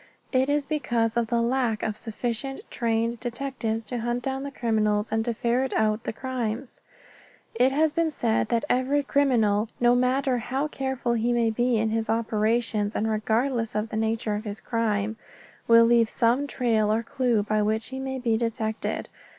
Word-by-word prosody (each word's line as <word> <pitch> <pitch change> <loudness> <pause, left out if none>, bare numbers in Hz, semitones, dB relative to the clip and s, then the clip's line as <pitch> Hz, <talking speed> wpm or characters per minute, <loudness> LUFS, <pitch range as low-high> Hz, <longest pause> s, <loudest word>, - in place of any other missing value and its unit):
It 260 +1 +2
is 290 0 +1
because 240 -7 0
of 235 -1 +1
the 235 0 +1
lack 240 -3 0
of 215 - -1
sufficient 240 +4 -4
trained 230 0 0
detectives 240 -2 -3
to 245 +2 -4
hunt 240 +1 -2
down 270 0 -2
the 280 - -4
criminals 215 -5 0
and 220 0 +1
to 235 - 0
ferret 245 +3 0
out 215 0 +1
the - - -1
crimes. 245 0 -4 0.7
It 250 +3 +3
has 300 +2 +2
been 330 0 +1
said 230 -7 0
that 235 +3 +1
every 270 +3 +1
criminal, 230 -7 +2
no 240 0 +5
matter 255 +1 +2
how 265 +6 -2
careful 265 -4 -2
he 235 +1 +1
may 235 -2 +2
be 240 +1 +1
in 220 0 0
his 225 0 -1
operations 220 -1 0
and 220 - 0
regardless 225 +2 0
of 210 +1 -1
the - - -5
nature 220 0 0
of 210 +1 -3
his 210 0 -5
crime, 220 -2 -1 0.5
will 230 0 +7
leave 230 -1 +4
some 240 +6 +1
trail 225 -6 +1
or 225 +2 +1
clue 245 -4 +1
by 215 0 0
which 220 +1 -1
he 265 0 -5
may 265 0 -3
be 235 -3 +1
detected. 225 -1 -2
235 Hz, 180 wpm, -26 LUFS, 220-255 Hz, 0.7 s, will